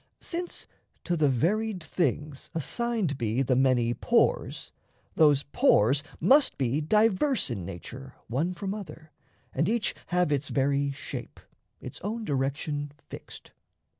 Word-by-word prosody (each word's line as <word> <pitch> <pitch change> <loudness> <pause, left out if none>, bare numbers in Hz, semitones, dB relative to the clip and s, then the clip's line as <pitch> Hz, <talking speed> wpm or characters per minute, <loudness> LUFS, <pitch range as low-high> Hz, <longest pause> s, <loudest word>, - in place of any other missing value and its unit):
Since 350 0 -3 0.4
to 175 - 0
the 155 -3 +3
varied 185 - 0
things 150 -2 -2
assigned 205 - -1
be 115 +3 +1
The 130 0 +2
many 125 -2 +3
pores, - - +1 0.4
those 145 -3 +5
pores 140 - +3 0.2
must 270 - +4
be 135 +2 0
diverse 215 - +2
In 95 -7 -4
nature 130 +9 -8
one 155 +10 -1
from 195 +2 -3
other, 175 -6 -9 0.4
and - - +1
each 225 -4 +1
have 180 -3 +1
Its 145 -1 0
very 140 +1 +1
shape, 140 - -7 0.4
its - - -9
own 220 +3 -3
direction 145 +1 -2 0.2
fixed. - - -10
150 Hz, 130 wpm, -28 LUFS, 135-200 Hz, 0.4 s, those